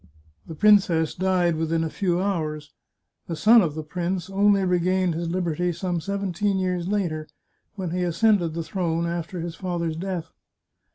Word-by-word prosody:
The 160 Hz, -, -7 dB
princess 180 Hz, -5 st, +4 dB
died 180 Hz, -3 st, +1 dB
within 160 Hz, 0 st, 0 dB
a 160 Hz, -, -2 dB
few 175 Hz, +2 st, 0 dB
hours; 155 Hz, -6 st, -2 dB, 0.5 s
the 165 Hz, -, -3 dB
son 225 Hz, +7 st, +6 dB
of 160 Hz, -6 st, -1 dB
the 155 Hz, -, -4 dB
prince 180 Hz, +3 st, -3 dB
only 200 Hz, 0 st, +3 dB
regained 180 Hz, 0 st, +1 dB
his 165 Hz, +1 st, -3 dB
liberty 175 Hz, -1 st, -1 dB
some 175 Hz, 0 st, -3 dB
seventeen 200 Hz, +1 st, -1 dB
years 180 Hz, -2 st, -1 dB
later, 170 Hz, -7 st, -1 dB, 0.5 s
when 185 Hz, -5 st, -4 dB
he 180 Hz, +1 st, -1 dB
ascended 175 Hz, -1 st, +2 dB
the 165 Hz, -, -2 dB
throne 165 Hz, -1 st, -1 dB
after 170 Hz, +1 st, -4 dB
his 170 Hz, 0 st, -4 dB
father's 170 Hz, -2 st, -3 dB
death. 175 Hz, -1 st, -4 dB
175 Hz, 160 wpm, -24 LUFS, 165-190 Hz, 0.5 s, son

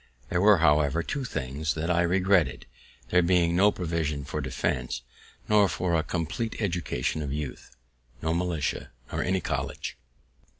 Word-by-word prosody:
There 85 Hz, -, +1 dB
were, 105 Hz, 0 st, +7 dB
however, 75 Hz, 0 st, +3 dB
two, 140 Hz, +8 st, -3 dB
things 70 Hz, -, -2 dB
that 80 Hz, +2 st, -1 dB
I 85 Hz, 0 st, +3 dB
regretted, 90 Hz, -5 st, +2 dB, 0.5 s
there 90 Hz, -, +5 dB
being 85 Hz, -1 st, +3 dB
no 100 Hz, +3 st, +5 dB
provision 80 Hz, -6 st, -2 dB
for -, -, -3 dB
defense, -, -, -2 dB, 0.4 s
nor 105 Hz, -2 st, +5 dB
for 85 Hz, +1 st, -1 dB
a 80 Hz, -, +3 dB
compleat 85 Hz, +9 st, -3 dB
education 85 Hz, -, -1 dB
of 70 Hz, -2 st, -3 dB
youth; 70 Hz, -4 st, -6 dB, 0.4 s
no 80 Hz, 0 st, -1 dB
militia, 85 Hz, -3 st, -1 dB, 0.2 s
nor -, -, -1 dB
any 95 Hz, 0 st, 0 dB
college. -, -, -4 dB
85 Hz, 145 wpm, -27 LUFS, 75-90 Hz, 0.5 s, were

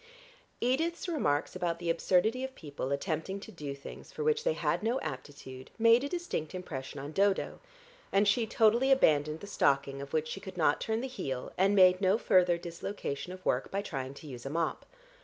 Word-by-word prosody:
Edith's 320 Hz, +9 st, 0 dB
remarks 155 Hz, -, 0 dB
about 170 Hz, -1 st, -1 dB
the 170 Hz, -1 st, 0 dB
absurdity 190 Hz, +9 st, +2 dB
of 265 Hz, 0 st, -5 dB
people 145 Hz, -3 st, -5 dB
attempting 160 Hz, +6 st, -2 dB
to -, -, -10 dB
do 145 Hz, -5 st, -6 dB
things 140 Hz, -, -11 dB
for 455 Hz, -, -4 dB
which 455 Hz, 0 st, +2 dB
they -, -, +2 dB
had -, -, 0 dB
no 235 Hz, +4 st, 0 dB
aptitude 130 Hz, -3 st, -7 dB
made 230 Hz, +2 st, +5 dB
a 285 Hz, -, -2 dB
distinct 340 Hz, -, -3 dB
impression 145 Hz, -6 st, -6 dB
on 140 Hz, +2 st, -6 dB
Dodo, 195 Hz, +3 st, +1 dB, 0.5 s
and 200 Hz, +1 st, +3 dB
she 220 Hz, +3 st, +3 dB
totally 235 Hz, +5 st, +3 dB
abandoned 155 Hz, -, +3 dB
the -, -, -7 dB
stocking 140 Hz, -8 st, +1 dB
of 140 Hz, -, -8 dB
which 155 Hz, 0 st, 0 dB
she 195 Hz, -, -5 dB
could 190 Hz, -1 st, -9 dB
not 150 Hz, -3 st, +2 dB
turn 220 Hz, +1 st, -1 dB
the 265 Hz, -, -3 dB
heel, 135 Hz, -, -4 dB
and 195 Hz, +2 st, +3 dB
made 185 Hz, -1 st, +6 dB
no 190 Hz, +2 st, +4 dB
further 180 Hz, -5 st, +4 dB
dislocation 170 Hz, -1 st, -5 dB
of 185 Hz, 0 st, -10 dB
work 125 Hz, -, +1 dB
by 200 Hz, +1 st, -2 dB
trying 135 Hz, -6 st, -5 dB
to 155 Hz, -, -12 dB
use 125 Hz, -3 st, -8 dB
a 135 Hz, -, -4 dB
mop. 165 Hz, +2 st, -2 dB
180 Hz, 195 wpm, -31 LUFS, 145-225 Hz, 0.5 s, made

